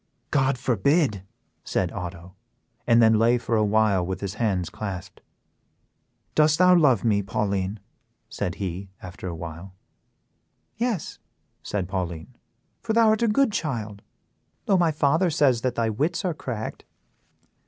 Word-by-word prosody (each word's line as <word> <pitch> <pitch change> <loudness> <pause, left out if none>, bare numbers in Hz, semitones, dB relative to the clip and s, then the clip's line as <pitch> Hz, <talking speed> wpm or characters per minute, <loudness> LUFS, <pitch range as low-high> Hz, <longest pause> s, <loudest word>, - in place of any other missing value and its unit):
"God 135 -2 +2
forbid!" 125 - +1 0.4
said - - -1
Otto, 90 0 -7 0.5
and 115 -1 +5
then 110 -1 +5
lay 120 +2 +4
for 115 -1 -2
a 110 - +3
while 105 -3 +2
with 95 +1 -4
his 100 -1 -3
hands 100 -6 -1
clasped. 100 -4 -7 1.1
"Dost 155 0 +4
thou 180 0 +6
love 135 - +4
me, 105 -3 +2
Pauline?" 100 0 -2 0.5
said 90 - -4
he, 95 0 -5
after 95 0 -8
a 85 - -4
while. 85 +3 -8 1.0
"Yes," 230 -8 -2 0.4
said 100 -4 -3
Pauline, 90 +3 -5 0.5
"for 225 - -2
thou 225 -1 +5
art 215 +1 +2
a 235 - +3
good 225 +3 +3
child, 110 - -3 0.6
though 195 - +3
my 175 -3 +3
father 155 +4 +2
says 140 -7 +2
that 125 0 -1
thy 115 -1 0
wits 160 - -1
are 180 - 0
cracked." 120 -7 -6
110 Hz, 145 wpm, -25 LUFS, 95-150 Hz, 1.1 s, thou